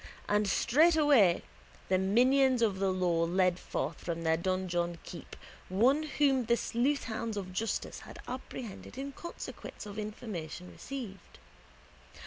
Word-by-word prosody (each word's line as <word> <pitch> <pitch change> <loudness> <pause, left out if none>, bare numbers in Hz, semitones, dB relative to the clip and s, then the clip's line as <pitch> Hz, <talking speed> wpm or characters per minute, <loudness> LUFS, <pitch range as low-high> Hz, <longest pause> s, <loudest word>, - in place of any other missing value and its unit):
And 210 0 +2
straightway 290 - +5 0.4
the 185 0 +3
minions 250 +5 +4
of 200 -4 +1
the 195 -1 +2
law 175 -3 +1
led 180 +1 +2
forth 150 +5 -3
from 170 -1 -4
their 160 0 +3
donjon 175 -1 -1
keep 170 - -9 0.3
one 245 +11 +4 0.2
whom 270 -4 +3
the 235 +1 +3
sleuthhounds 230 -4 -1
of 185 -2 -5
justice 225 +4 -2
had - - -11
apprehended 250 -2 -7
in 275 +1 -4
consequence 340 -5 -8
of 205 +1 -6
information 185 -5 -6
received. 240 -8 -8
210 Hz, 125 wpm, -31 LUFS, 180-255 Hz, 0.4 s, straightway